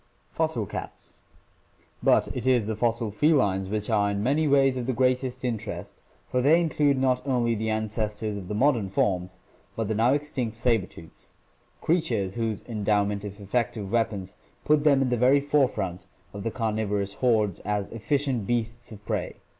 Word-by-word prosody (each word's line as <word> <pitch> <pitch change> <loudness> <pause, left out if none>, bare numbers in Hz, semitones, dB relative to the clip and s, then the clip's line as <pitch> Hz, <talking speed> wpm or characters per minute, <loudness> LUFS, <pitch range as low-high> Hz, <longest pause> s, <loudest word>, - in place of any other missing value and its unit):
Fossil 155 -9 -1
Cats. - - -8 0.4
— - - -31
But - - +4
it 125 0 -3
is 125 -4 +3
the 110 +1 -2
fossil 115 0 0
felines 105 -8 +2
which 105 0 -2
are 105 -3 +2
in 100 0 -2
many 145 +6 +2
ways 135 -2 +4
of 125 -1 -3
the 130 - +1
greatest 130 +1 0
interest, 115 -3 -5 0.3
for 125 - 0
they 155 +6 +5
include 150 -4 +2
not 130 -1 +2
only 120 -3 +1
the 110 0 -2
ancestors 110 0 -2
of 100 -3 -7
the 105 - -3
modern 120 -4 +2
forms, 90 -1 -1 0.4
but 115 -2 -2
the 110 - 0
now 115 +5 +3
extinct 135 -6 -3
saber 115 -5 +1
tooths 80 -1 -13 0.2
— - - -38
creatures 120 - 0
whose 115 -2 -2
endowment 105 -2 0
of 100 0 -7
effective 105 0 -2
weapons 105 -5 -1 0.3
put 150 -1 +3
them 140 -3 +4
in 130 - 0
the 125 - +1
very 130 +4 +5
fore 145 -1 +3
front 95 -4 -5 0.3
of 100 - -6
the 115 - -1
carnivorous 105 -4 -2
hordes 110 -7 +2
as 105 -1 -2
efficient 130 -1 -1
beasts 120 0 -2
of 105 -1 -12
prey. - - -2
115 Hz, 180 wpm, -26 LUFS, 105-130 Hz, 0.4 s, they